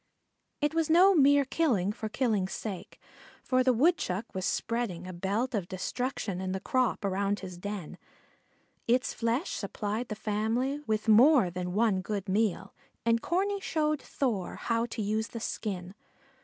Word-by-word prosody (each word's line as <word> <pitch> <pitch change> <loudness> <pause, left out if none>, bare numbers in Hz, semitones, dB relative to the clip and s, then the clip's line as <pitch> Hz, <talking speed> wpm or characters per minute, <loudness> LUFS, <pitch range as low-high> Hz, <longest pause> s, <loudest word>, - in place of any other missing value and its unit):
It 295 +1 +1
was 325 -1 +1
no 365 +5 +7
mere 285 -3 +5
killing 245 - +1
for 215 +1 -5
killing's 215 -6 0
sake, 200 -5 -6 0.4
for 255 -1 +2
the 255 - +4
Woodchuck 235 - +1
was 190 0 -3
spreading 225 -7 -2
a 185 - -7
belt 200 +8 -1
of 200 -6 -1
destruction 195 0 -3
in 185 0 -2
the 190 - -2
crop 255 -1 0
around 200 +1 0
his 185 -2 -7
den. 200 -3 -6 0.9
Its 250 +2 +2
flesh 235 +8 -1
supplied 215 +3 -3
the 215 - -4
family 225 +7 -1
with 215 0 -1
more 235 - +6
than 180 0 -4
one 210 -2 +2
good 200 0 -4
meal 195 -1 0 0.3
and 230 0 +3
Corney 395 +3 0
showed 305 -5 0
Thor 230 -9 -2
how 230 0 -1
to 225 -2 -4
use 215 +2 -1
the 230 - -7
skin. 190 -5 -4
220 Hz, 155 wpm, -29 LUFS, 195-255 Hz, 0.9 s, no